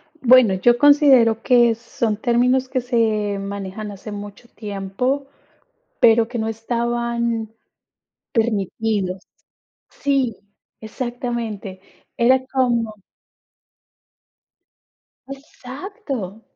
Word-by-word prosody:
Bueno, 255 Hz, -7 st, +5 dB
yo 240 Hz, +6 st, +3 dB
considero 265 Hz, -6 st, +5 dB
que 240 Hz, -2 st, +4 dB
son 230 Hz, -1 st, -3 dB
términos 250 Hz, +3 st, +1 dB
que 260 Hz, 0 st, -1 dB
se 220 Hz, -4 st, 0 dB
manejan 200 Hz, +1 st, -6 dB
hace 205 Hz, +2 st, -9 dB
mucho 205 Hz, +3 st, -9 dB
tiempo, 210 Hz, +7 st, -3 dB, 0.7 s
pero 225 Hz, -1 st, +5 dB
que 240 Hz, 0 st, -5 dB
no 220 Hz, -, -2 dB
estaban 235 Hz, 0 st, -2 dB, 0.8 s
permitidos. 210 Hz, -3 st, -1 dB, 0.6 s
Sí, 270 Hz, -6 st, -1 dB, 0.5 s
exactamente. 230 Hz, -4 st, -5 dB, 0.4 s
Era 255 Hz, +2 st, +3 dB
como 235 Hz, -4 st, 0 dB, 2.3 s
Exacto. 270 Hz, -, -7 dB
235 Hz, 80 wpm, -21 LUFS, 210-250 Hz, 2.3 s, Bueno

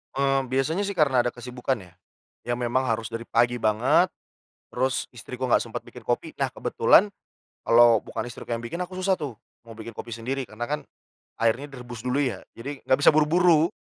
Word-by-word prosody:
Eee, 135 Hz, 0 st, +2 dB
biasanya 135 Hz, +9 st, 0 dB
sih 200 Hz, -, -4 dB
karena 140 Hz, -6 st, +3 dB
ada 120 Hz, -, +1 dB
kesibukan 125 Hz, +2 st, -3 dB
ya, 90 Hz, -1 st, -16 dB, 0.5 s
yang 120 Hz, -, +1 dB
memang 125 Hz, +2 st, 0 dB
harus 115 Hz, -1 st, -1 dB
dari 115 Hz, 0 st, -6 dB
pagi 120 Hz, +1 st, +2 dB
banget, 110 Hz, -1 st, +3 dB, 0.6 s
terus 130 Hz, +1 st, -1 dB
istriku 125 Hz, +2 st, -6 dB
nggak -, -, +4 dB
sempet -, -, -6 dB
bikin -, -, -13 dB
kopi, -, -, -1 dB
nah -, -, +2 dB
kebetulan 205 Hz, +2 st, +4 dB, 0.5 s
kalau 120 Hz, -1 st, +6 dB
bukan 115 Hz, +1 st, -5 dB
istriku 120 Hz, -, -8 dB
yang 115 Hz, -, -1 dB
bikin, 120 Hz, +7 st, -5 dB
aku 180 Hz, -, -14 dB
susah 190 Hz, 0 st, +2 dB
tuh 145 Hz, -6 st, -5 dB, 0.3 s
mau 115 Hz, -, -11 dB
bikin 115 Hz, 0 st, -9 dB
kopi 115 Hz, -, -7 dB
sendiri 130 Hz, +4 st, -3 dB
karena 120 Hz, +1 st, -6 dB
kan 150 Hz, +1 st, -1 dB, 0.6 s
airnya 115 Hz, +5 st, +1 dB
direbus 125 Hz, -4 st, -9 dB
dulu 135 Hz, +3 st, +1 dB
ya, 130 Hz, -, -2 dB, 0.2 s
jadi 135 Hz, +4 st, -7 dB
nggak 130 Hz, -, +4 dB
bisa -, -, +8 dB
buru-buru. 160 Hz, +1 st, +4 dB
125 Hz, 185 wpm, -25 LUFS, 115-140 Hz, 0.6 s, bisa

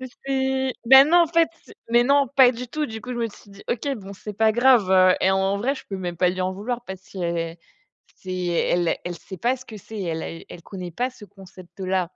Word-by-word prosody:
mais 260 Hz, -, -6 dB, 0.2 s
c'est 265 Hz, -1 st, 0 dB
bah, 265 Hz, +2 st, +10 dB
non, 345 Hz, +4 st, +5 dB
en -, -, -5 dB
fait, 330 Hz, 0 st, +3 dB, 0.2 s
c'est -, -, -16 dB, 0.2 s
mais 240 Hz, +1 st, +4 dB
non 280 Hz, 0 st, +3 dB
pas 255 Hz, -2 st, +7 dB
du 245 Hz, +1 st, -7 dB
tout, 300 Hz, +4 st, -2 dB
du 220 Hz, -2 st, -7 dB
coup 250 Hz, -, -8 dB
je -, -, -5 dB
me 230 Hz, -, 0 dB
suis 205 Hz, -, -17 dB
dit: 200 Hz, 0 st, -14 dB
«OK 245 Hz, +4 st, -2 dB
bon 200 Hz, -2 st, -10 dB
c'est 210 Hz, +2 st, -8 dB
pas 220 Hz, +2 st, +3 dB
grave, 240 Hz, -3 st, +4 dB
heu» 185 Hz, -1 st, +5 dB
et 190 Hz, -, +3 dB
en 190 Hz, +1 st, +1 dB
vrai 255 Hz, +7 st, 0 dB
je -, -, -10 dB
peux 195 Hz, -, -4 dB
même 175 Hz, -2 st, -5 dB
pas 180 Hz, +2 st, +3 dB
lui 185 Hz, +1 st, -5 dB
en 185 Hz, 0 st, -1 dB
vouloir 230 Hz, +5 st, -4 dB
parce 190 Hz, -1 st, -7 dB
c'est 170 Hz, -3 st, -4 dB, 0.6 s
c'est 185 Hz, -, -8 dB
elle 175 Hz, 0 st, +1 dB
elle 175 Hz, -1 st, -4 dB
sait 190 Hz, -, -10 dB
pas 245 Hz, +6 st, +1 dB
ce 255 Hz, -, -14 dB
que 220 Hz, -, -9 dB
c'est, 215 Hz, +2 st, -8 dB
elle 165 Hz, -1 st, -5 dB
elle 170 Hz, -, -11 dB
connaît 180 Hz, -1 st, -8 dB
pas 250 Hz, +9 st, -2 dB
ce 240 Hz, -4 st, -14 dB
concept-là. 185 Hz, -1 st, -5 dB
205 Hz, 245 wpm, -23 LUFS, 185-250 Hz, 0.6 s, bah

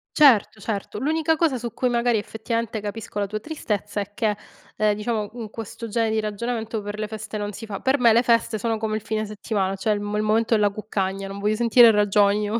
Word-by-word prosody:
Certo, 240 Hz, -8 st, +5 dB
certo. 205 Hz, 0 st, -4 dB
L'unica 320 Hz, +3 st, +1 dB
cosa 305 Hz, -6 st, +2 dB
su 235 Hz, -1 st, -5 dB
cui 255 Hz, -, 0 dB
magari 240 Hz, -1 st, +2 dB
effettivamente 220 Hz, +1 st, -3 dB
capisco 210 Hz, 0 st, -5 dB
la 200 Hz, -, 0 dB
tua 215 Hz, +1 st, -4 dB
tristezza 210 Hz, -, -3 dB
è 200 Hz, +1 st, -7 dB
che, 215 Hz, -3 st, 0 dB, 0.4 s
ehm, 210 Hz, -1 st, +2 dB
diciamo, 210 Hz, -1 st, -2 dB
in 225 Hz, -3 st, -6 dB
questo 225 Hz, +1 st, -7 dB
genere 225 Hz, +1 st, 0 dB
di 220 Hz, -, +1 dB
ragionamento 220 Hz, +1 st, -3 dB
per 205 Hz, +1 st, -6 dB
le 215 Hz, -, -2 dB
feste 215 Hz, 0 st, -6 dB
non 205 Hz, 0 st, -4 dB
si 225 Hz, +3 st, -8 dB
fa. 200 Hz, -2 st, -5 dB
Per 265 Hz, +1 st, +1 dB
me 235 Hz, -2 st, +6 dB
le 235 Hz, +3 st, +4 dB
feste 230 Hz, -1 st, +2 dB
sono 225 Hz, +1 st, -1 dB
come 215 Hz, 0 st, -2 dB
il -, -, -6 dB
fine 220 Hz, 0 st, -2 dB
settimana, 205 Hz, -2 st, -2 dB
cioè 210 Hz, +2 st, 0 dB
il 205 Hz, -, -2 dB
mo 205 Hz, 0 st, -3 dB
il 215 Hz, -, 0 dB
momento 225 Hz, +2 st, +2 dB
della 205 Hz, -1 st, +3 dB
cuccagna, 195 Hz, -2 st, -3 dB
non 195 Hz, +1 st, -7 dB
voglio 210 Hz, +1 st, +1 dB
sentire 235 Hz, 0 st, +6 dB
ragioni, 205 Hz, 0 st, +3 dB
io. 215 Hz, +3 st, -1 dB
215 Hz, 230 wpm, -23 LUFS, 205-230 Hz, 0.4 s, me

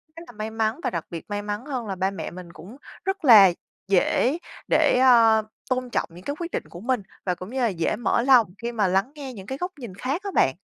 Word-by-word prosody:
rất 330 Hz, -, -9 dB
là -, -, -11 dB
may 215 Hz, 0 st, -5 dB
mắn 225 Hz, +3 st, -1 dB
và -, -, +1 dB
đặc 170 Hz, -2 st, -4 dB
biệt 165 Hz, -1 st, -7 dB
may 205 Hz, 0 st, -2 dB
mắn 210 Hz, +3 st, -5 dB
hơn 255 Hz, -6 st, -4 dB
là 195 Hz, -, -3 dB
ba 190 Hz, +1 st, 0 dB
mẹ 195 Hz, -, -6 dB
mình 175 Hz, -1 st, -10 dB
cũng 185 Hz, +11 st, -12 dB, 0.3 s
rất 385 Hz, -3 st, -2 dB
là 210 Hz, -7 st, +9 dB, 0.4 s
dễ 200 Hz, -, +2 dB, 0.3 s
để, -, -, +3 dB
a, 230 Hz, -4 st, +6 dB, 0.3 s
tôn 255 Hz, -1 st, -1 dB
trọng -, -, -1 dB
những 175 Hz, +2 st, -12 dB
cái 285 Hz, -, -3 dB
quyết 340 Hz, 0 st, -5 dB
định -, -, -2 dB
của 175 Hz, -, -10 dB
mình, 245 Hz, +2 st, -1 dB, 0.2 s
và 180 Hz, -2 st, 0 dB
cũng 185 Hz, +2 st, -9 dB
như 265 Hz, +3 st, -4 dB
là 240 Hz, -, +3 dB
dễ 170 Hz, -6 st, -1 dB
mở 235 Hz, 0 st, +1 dB
lòng 250 Hz, -3 st, +5 dB
khi 235 Hz, +3 st, -4 dB
mà 215 Hz, -4 st, +1 dB
lắng 195 Hz, +7 st, +1 dB
nghe 275 Hz, -3 st, -7 dB
những 195 Hz, -5 st, -10 dB
cái 265 Hz, -, -4 dB
góc 360 Hz, +4 st, -3 dB
nhìn 230 Hz, -8 st, -8 dB
khác 270 Hz, -, -3 dB
á 400 Hz, -, -4 dB
bạn. 130 Hz, -, +3 dB
225 Hz, 260 wpm, -24 LUFS, 195-260 Hz, 0.4 s, là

